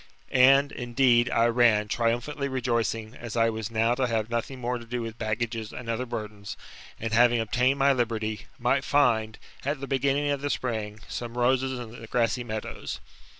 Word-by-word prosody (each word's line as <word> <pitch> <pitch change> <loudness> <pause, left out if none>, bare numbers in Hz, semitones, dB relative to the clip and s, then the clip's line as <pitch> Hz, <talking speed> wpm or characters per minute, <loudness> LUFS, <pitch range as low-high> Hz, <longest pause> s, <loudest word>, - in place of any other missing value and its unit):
And, 135 +2 +6
indeed, 120 0 +2
I 115 - +3
ran, 115 -3 +4
triumphantly 120 +6 -1
rejoicing, 115 -4 -1
as 120 -2 -7
I 115 0 +3
was 110 -1 -4
now 115 +1 +2
to 130 0 0
have 115 -1 -1
nothing 120 +3 -3
more 125 0 -2
to 115 - -11
do 120 +1 -3
with 115 0 -7
baggages 110 0 -2
and 125 - -8
other 115 +2 -2
burdens, 105 -3 -6 0.4
and, 115 0 -3
having 120 +1 +5
obtained 125 +5 +1
my 140 0 +4
liberty, 110 -3 -2
might 135 +2 +1
find, 115 -7 +2 0.3
at 140 +1 -1
the 140 - -4
beginning 140 +2 +1
of 140 -1 -1
the 145 - -2
spring, 110 -5 -3
some 120 0 -6
roses 130 +1 +2
in 120 -2 -7
the 115 - -9
grassy 120 +2 +1
meadows. 110 -2 -5
120 Hz, 180 wpm, -27 LUFS, 115-130 Hz, 0.4 s, And